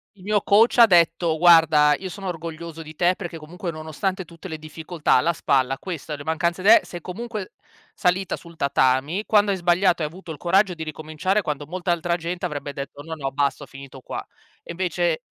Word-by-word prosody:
Il 190 Hz, -, -19 dB
mio 205 Hz, +1 st, +1 dB
coach 220 Hz, +5 st, +4 dB
ha 235 Hz, -, +10 dB
detto: 170 Hz, -3 st, +3 dB
"Guarda, 160 Hz, -4 st, +6 dB
io 190 Hz, -, -6 dB
sono 195 Hz, +1 st, -7 dB
orgoglioso 165 Hz, -1 st, -6 dB
di 155 Hz, 0 st, -11 dB
te 180 Hz, +2 st, +2 dB
perché 170 Hz, -4 st, -7 dB
comunque 170 Hz, +3 st, -6 dB
nonostante 165 Hz, +5 st, -4 dB
tutte 170 Hz, +2 st, -11 dB
le 160 Hz, -3 st, -6 dB
difficoltà 155 Hz, +1 st, -2 dB
alla 165 Hz, +7 st, +3 dB
spalla, 135 Hz, -3 st, +1 dB
questa, 160 Hz, -4 st, -6 dB
le 145 Hz, -, -9 dB
mancanze 170 Hz, +3 st, -1 dB
d 195 Hz, -, -1 dB
eh, 230 Hz, -, +8 dB
sei 175 Hz, -2 st, -9 dB
comunque 215 Hz, +2 st, -6 dB, 0.4 s
salita 180 Hz, +1 st, 0 dB
sul 170 Hz, -1 st, -14 dB
tatami, 140 Hz, +6 st, +1 dB
quando 205 Hz, -1 st, +3 dB
hai 195 Hz, -, +1 dB
sbagliato 175 Hz, -1 st, +2 dB
hai -, -, 0 dB
avuto 175 Hz, +1 st, -13 dB
il 150 Hz, -, -7 dB
coraggio 185 Hz, +1 st, +2 dB
di 160 Hz, -, -6 dB
ricominciare, 155 Hz, +6 st, -2 dB
quando 150 Hz, -4 st, -4 dB
molta 175 Hz, +2 st, -3 dB
altra 170 Hz, 0 st, 0 dB
gente 175 Hz, +2 st, -4 dB
avrebbe 145 Hz, -3 st, -5 dB
detto: 140 Hz, +1 st, -7 dB
'No, 160 Hz, +1 st, -6 dB
no, 135 Hz, -3 st, -4 dB
basta, 140 Hz, +1 st, -1 dB
ho -, -, -11 dB
finito 135 Hz, -1 st, -12 dB
qua'". -, -, -6 dB, 0.4 s
E -, -, -22 dB
invece 175 Hz, -2 st, -1 dB
170 Hz, 205 wpm, -23 LUFS, 155-185 Hz, 0.4 s, ha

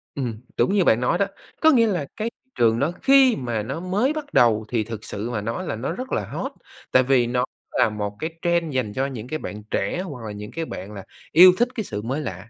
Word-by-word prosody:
Ừm, 120 Hz, -5 st, -3 dB, 0.2 s
đúng 195 Hz, -, +2 dB
như 195 Hz, -3 st, +4 dB
bạn 115 Hz, -4 st, +3 dB
nói 125 Hz, -, +2 dB
đó, 200 Hz, -, +2 dB, 0.4 s
có 315 Hz, 0 st, +7 dB
nghĩa 230 Hz, -4 st, +5 dB
là 175 Hz, -8 st, -1 dB
cái 220 Hz, +2 st, -1 dB
thị 260 Hz, +2 st, -42 dB
trường 115 Hz, -1 st, +3 dB
đó 150 Hz, +5 st, +1 dB
khi 270 Hz, -3 st, +6 dB
mà 120 Hz, -4 st, -2 dB
nó 135 Hz, +8 st, -4 dB
mới 205 Hz, -, 0 dB
bắt 295 Hz, -2 st, -6 dB
đầu 110 Hz, -3 st, +4 dB
thì 115 Hz, -3 st, 0 dB
thực 110 Hz, -1 st, -7 dB
sự 105 Hz, +4 st, -5 dB
mà 105 Hz, -4 st, -2 dB
nói 115 Hz, -, -3 dB
là -, -, -2 dB
nó 115 Hz, +8 st, -3 dB
rất 255 Hz, +8 st, -6 dB
là -, -, 0 dB
hot, -, -, -4 dB, 0.4 s
tại 130 Hz, -, +5 dB
vì 125 Hz, -2 st, +3 dB
nó 125 Hz, +1 st, +1 dB, 0.3 s
là -, -, +3 dB
một 105 Hz, -1 st, -4 dB
cái 160 Hz, -, -2 dB
trend 170 Hz, -4 st, +1 dB
dành 115 Hz, -6 st, -1 dB
cho 135 Hz, +4 st, 0 dB
những 125 Hz, -4 st, -6 dB
cái 155 Hz, +2 st, -3 dB
bạn 105 Hz, 0 st, -7 dB
trẻ 100 Hz, -, -1 dB
hoặc 140 Hz, -11 st, -7 dB
là 105 Hz, -, -5 dB
những 105 Hz, +1 st, -8 dB
cái 165 Hz, 0 st, -3 dB
bạn 100 Hz, -5 st, -7 dB
là 100 Hz, -2 st, -8 dB, 0.3 s
yêu 180 Hz, +3 st, +9 dB
thích 240 Hz, +1 st, +3 dB
cái 220 Hz, -, -2 dB
sự 105 Hz, -, -5 dB
mới 135 Hz, +7 st, -2 dB
lạ. 95 Hz, -1 st, -6 dB
130 Hz, 260 wpm, -23 LUFS, 110-185 Hz, 0.4 s, yêu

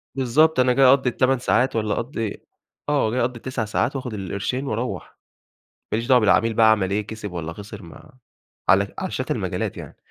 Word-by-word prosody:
بالضبط 135 Hz, +3 st, +3 dB
أنا 125 Hz, 0 st, +4 dB
جاي 135 Hz, +1 st, +4 dB
أقضّي 130 Hz, 0 st, +5 dB
ال8 130 Hz, +1 st, +1 dB
ساعات 125 Hz, +1 st, +1 dB
والَّا 110 Hz, -2 st, 0 dB
أقضي 115 Hz, -4 st, -4 dB, 0.4 s
آه 140 Hz, -7 st, +1 dB
جاي 125 Hz, -, 0 dB
أقضّي 120 Hz, 0 st, -1 dB
ال9 125 Hz, -2 st, -4 dB
ساعات 120 Hz, +6 st, -1 dB
وآخد 125 Hz, -3 st, -5 dB
القرشين 100 Hz, +7 st, -3 dB
وأروّح، 120 Hz, +2 st, -4 dB, 0.8 s
ما -, -, +2 dB
ليش 115 Hz, +1 st, -3 dB
دعوة 125 Hz, -1 st, +6 dB
بالعميل 110 Hz, +1 st, +3 dB
بقى 110 Hz, 0 st, +5 dB
عمل 100 Hz, -4 st, +2 dB
إيه، 105 Hz, +1 st, -1 dB
كسب 105 Hz, -3 st, -7 dB
والَّا 85 Hz, -2 st, -5 dB
خسر 105 Hz, +2 st, -10 dB
ما 85 Hz, -, -14 dB, 0.6 s
على -, -, +3 dB
على -, -, -3 dB
شتى -, -, -2 dB
المجالات -, -, -3 dB
يعني. -, -, -10 dB
115 Hz, 190 wpm, -22 LUFS, 105-130 Hz, 0.8 s, دعوة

